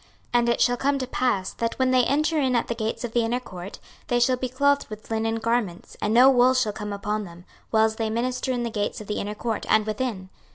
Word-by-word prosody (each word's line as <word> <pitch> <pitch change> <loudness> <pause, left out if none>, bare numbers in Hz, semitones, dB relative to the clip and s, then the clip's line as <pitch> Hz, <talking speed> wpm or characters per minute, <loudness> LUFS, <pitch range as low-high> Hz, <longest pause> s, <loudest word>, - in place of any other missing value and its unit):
26:044:017 240 - +5
And 235 0 +1
it 235 - +1
shall 245 0 +3
come 280 +3 +1
to 260 - -2
pass, 245 -7 -1
that 230 0 -3
when 260 -1 +2
they 255 -1 +4
enter 305 +3 +1
in 260 -3 +1
at 235 - +1
the - - -1
gates 225 0 -3
of 240 - -3
the 240 - +1
inner 235 +2 0
court, 185 -5 -9 0.3
they 245 - +1
shall 255 +1 +3
be 255 0 -3
clothed 285 +3 +2
with 215 +1 -10
linen 225 0 0
garments; 225 -5 -2
and 210 - 0
no 245 +4 +7
wool 255 -1 +5
shall 235 -5 +1
come 210 -1 -5
upon 210 +1 -2
them, 175 0 -13 0.2
whiles 220 0 +2
they 225 -1 -1
minister 250 +3 -1
in 245 -1 -1
the 235 - -3
gates 205 -1 -2
of 215 - -8
the 210 - -3
inner 210 +1 -4
court, 225 0 -3
and 215 -1 +4
within. 215 -4 -3
235 Hz, 255 wpm, -25 LUFS, 215-255 Hz, 0.3 s, no